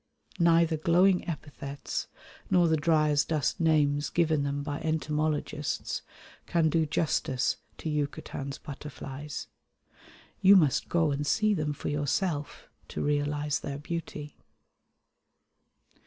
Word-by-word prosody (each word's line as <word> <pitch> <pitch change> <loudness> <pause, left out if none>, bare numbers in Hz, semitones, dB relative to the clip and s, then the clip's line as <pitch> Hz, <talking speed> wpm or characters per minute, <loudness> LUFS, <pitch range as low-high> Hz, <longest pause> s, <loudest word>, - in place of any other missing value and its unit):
Neither 165 -1 +4
glowing 180 +4 +3
epithets 145 -3 -5 0.4
nor 175 -2 +4
the 160 - +3
dry 155 0 +3
as 145 0 +3
dust 155 -3 -1
names 150 -3 +2
given 160 -3 +2
them 140 0 -2
by 145 0 -3
entomologists 155 -2 -1 0.5
can 165 -2 +2
do 160 -1 +2
justice 140 -4 0 0.2
to - - -6
Yucatan's 145 -2 -3
butterflies: 145 0 -7 1.0
you 195 +1 +8
must 150 -9 +3
go 165 -3 +2
and 145 +1 -2
see 215 +3 +3
them 150 -5 -1
for 145 - -4
yourself 145 +2 -1 0.2
to - - -4
realise 145 0 0
their 140 -1 -5
beauty. 150 -1 -6
150 Hz, 115 wpm, -29 LUFS, 145-165 Hz, 1.0 s, you